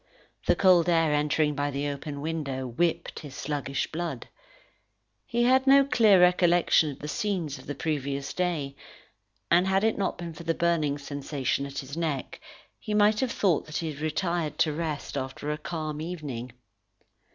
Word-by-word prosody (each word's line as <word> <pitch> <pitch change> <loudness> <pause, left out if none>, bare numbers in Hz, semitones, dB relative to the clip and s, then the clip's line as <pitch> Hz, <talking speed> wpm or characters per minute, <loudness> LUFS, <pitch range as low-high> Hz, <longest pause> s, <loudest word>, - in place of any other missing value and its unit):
The - - +5
cold 180 -3 +5
air 165 -3 +3
entering 150 0 +2
by 145 0 -1
the 140 +1 -2
open 145 0 -5
window, 145 -4 -3
whipped 160 +8 -1
his 145 -3 -10
sluggish 140 -1 -3
blood. 170 +1 -4 1.0
He 240 0 +1
had 260 +2 +4
no 275 0 +7
clear 220 -8 +5
recollection 175 -3 +4
of 140 - -7
the 150 - -7
scenes 180 - -2
of - - -14
the 145 - -4
previous 140 -2 -3
day, 160 -7 -2 0.8
and 175 +2 +5
had 190 +1 +2
it 220 -1 +1
not 195 - -1
been 170 -1 -6
for 155 - -10
the 165 -1 -1
burning 165 -4 +1
sensation 140 -1 -3
at 140 0 -9
his 135 +2 -5
neck, 155 -6 -3 0.4
he 210 - -3
might 210 +1 +4
have 260 -2 0
thought 180 -10 +1
that 155 - -4
he 160 -2 -2
had 145 - -10
retired 160 0 -1
to 155 - +2
rest 155 -3 -4
after 135 +2 -4
a 150 - -2
calm 155 -2 -4
evening. 145 -8 -5
155 Hz, 175 wpm, -27 LUFS, 145-175 Hz, 1.0 s, no